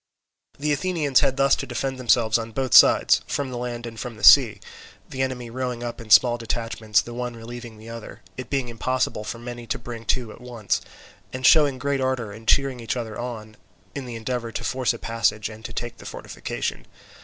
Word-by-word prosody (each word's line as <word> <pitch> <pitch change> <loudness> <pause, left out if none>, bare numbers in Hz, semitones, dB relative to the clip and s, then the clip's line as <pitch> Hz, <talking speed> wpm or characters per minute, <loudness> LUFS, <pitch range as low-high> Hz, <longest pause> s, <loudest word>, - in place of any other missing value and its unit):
The 150 +1 0
Athenians 150 -3 +2
had 135 - +1
thus 135 0 +4
to - - -5
defend 130 +1 -3
themselves 115 -2 +3
on 115 0 -6
both 130 -1 -2
sides, - - +7
from 140 -2 -2
the 125 - -4
land 120 -1 -4
and 115 -1 -8
from 125 -4 -6
the 105 - -13
sea; 115 -4 +8 0.5
the 130 - -4
enemy 125 -3 -3
rowing 125 -1 -3
up 120 -1 -5
in 115 - -12
small 120 +2 +6
detachments, 115 -2 0
the 120 - -9
one 125 0 -4
relieving 115 0 -9
the 110 +1 -12
other—it 115 +2 -9
being 135 -3 -1
impossible 120 -1 -1
for 110 - -5
many 120 0 -8
to - - -1
bring 115 -1 -8
to 120 -1 -1
at - - -13
once—and 125 +2 -5
showing 145 -2 +6
great 140 +1 -1
ardour 130 -5 -1
and 110 +2 -12
cheering 135 -2 +3
each 115 +2 -3
other 110 -3 -5
on, 110 -3 -6 0.4
in 135 -3 -6
the 120 - -6
endeavour 115 0 -3
to - - -5
force 130 -1 0
a 115 - -5
passage 110 -2 -1
and 110 0 -11
to 120 - -6
take 120 +1 -5
the - - -13
fortification. - - -5
120 Hz, 200 wpm, -24 LUFS, 115-130 Hz, 0.5 s, sea